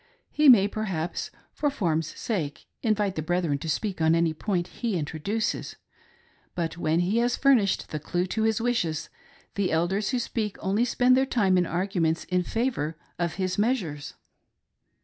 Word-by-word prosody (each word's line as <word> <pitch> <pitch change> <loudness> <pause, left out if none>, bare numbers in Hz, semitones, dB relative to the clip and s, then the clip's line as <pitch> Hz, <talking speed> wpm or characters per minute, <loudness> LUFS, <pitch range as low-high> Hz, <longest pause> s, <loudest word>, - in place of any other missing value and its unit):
He 300 -2 +5
may 205 -6 +8
perhaps 190 -6 -3 0.2
for 295 - 0
form's 165 - 0
sake 160 -11 -3 0.2
invite 210 -4 +1
the 155 - -3
brethren 165 -3 0
to 160 - -5
speak 185 +3 -2
on 160 +1 +4
any 165 -1 +2
point 175 +1 -2
he 230 -6 0
introduces; 170 +8 -2 0.8
but 165 -2 -2
when 165 0 +1
he 195 +6 +1
has 240 +1 +1
furnished 250 -9 +3
the 155 - -3
clew 175 +4 -1
to 215 +4 -2
his 220 0 +2
wishes, 225 -10 -1 0.4
the 200 -2 0
Elders 185 +5 +1
who 255 - 0
speak 225 -3 -2
only 200 +5 +1
spend 250 +1 +3
their 265 +1 +2
time 200 -8 +2
in 180 -2 +2
arguments 175 -3 0
in 180 0 0
favor 180 - -2 0.2
of 170 -2 -1
his 185 0 -2
measures. 195 - -1
190 Hz, 165 wpm, -26 LUFS, 165-220 Hz, 0.8 s, may